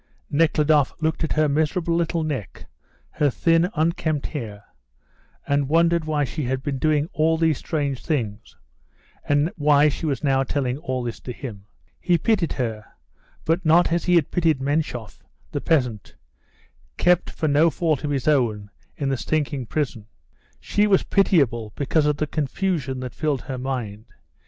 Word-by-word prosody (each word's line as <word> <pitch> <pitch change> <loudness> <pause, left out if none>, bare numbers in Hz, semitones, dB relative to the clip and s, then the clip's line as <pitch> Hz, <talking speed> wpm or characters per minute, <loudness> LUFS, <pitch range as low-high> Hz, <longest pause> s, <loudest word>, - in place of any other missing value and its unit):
Nekhludoff 150 -2 +3
looked 160 +1 -1
at 160 - -1
her 155 0 +2
miserable 160 +4 0
little 170 -1 0
neck, 135 - -5 0.5
her 145 - +1
thin, 165 +6 +2
unkempt 155 -2 0
hair, 105 -8 -6 0.8
and 140 -1 +1
wondered 170 +1 +3
why 150 -2 0
she 145 +2 -3
had 130 +1 -2
been 140 -2 -3
doing 150 0 +2
all 160 +1 +2
these 160 -3 +1
strange 140 -5 -2
things, 115 -8 -3 0.7
and 145 +3 +2
why 150 0 +4
she 155 +3 -4
was 140 +1 -2
now 135 -2 +2
telling 135 -1 -2
all 130 -6 -3
this 120 -1 -5
to 125 - -7
him. 110 -6 -8 0.3
He 175 -1 +2
pitied 200 -4 +1
her, 110 -4 -3 0.6
but 165 +3 +1
not 165 +1 +4
as 170 0 0
he 180 - +3
had 165 -5 +2
pitied 165 -5 +2
Menshoff, 135 -5 -2 0.3
the - - -3
peasant, 125 -10 0 0.8
kept 180 0 +3
for 155 - -2
no 150 +3 +4
fault 160 -3 -1
of 150 - -2
his 140 -2 -2
own 110 -9 +1 0.3
in 140 -2 -1
the 135 - 0
stinking 145 -3 -2
prison. 125 -8 -3 0.5
She 210 0 +1
was 195 -2 +3
pitiable 125 - +2
because 150 +2 +1
of 150 -1 +1
the 155 - 0
confusion 145 -2 -2
that 125 -2 -6
filled 150 -4 -1
her 130 -4 -6
mind. 120 -5 -4
145 Hz, 160 wpm, -23 LUFS, 130-160 Hz, 0.8 s, why